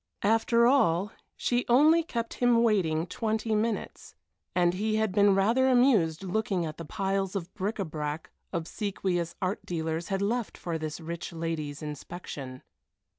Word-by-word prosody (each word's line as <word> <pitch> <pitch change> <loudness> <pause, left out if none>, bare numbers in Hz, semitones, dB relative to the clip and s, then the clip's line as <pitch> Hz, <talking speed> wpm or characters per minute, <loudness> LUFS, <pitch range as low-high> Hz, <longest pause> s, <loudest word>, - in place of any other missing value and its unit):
After 225 +2 +3
all, 205 -7 +3 0.3
she 245 0 +1
only 305 +7 +6
kept 235 -8 -4
him 240 -1 +3
waiting 170 -8 +2
twenty 220 +3 -2
minutes, 215 0 -2 0.4
and 175 -1 +3
he 215 +3 -1
had 220 -2 +1
been 200 0 +4
rather 230 +7 +3
amused 220 - +3
looking 190 -2 -1
at 155 -1 -6
the 165 - -7
piles 195 +1 -1
of 185 -2 -4
bric 210 +2 -2
à 195 -4 -3
brac 150 0 -4 0.2
obsequious 175 0 -2
art 185 +3 -1
dealers 160 0 -3
had 195 0 -1
left 235 +2 -1
for 165 -2 -3
this 155 0 -4
rich 170 +1 -6
lady's 160 -3 -4
inspection. 145 -3 -7
195 Hz, 150 wpm, -28 LUFS, 165-220 Hz, 0.4 s, only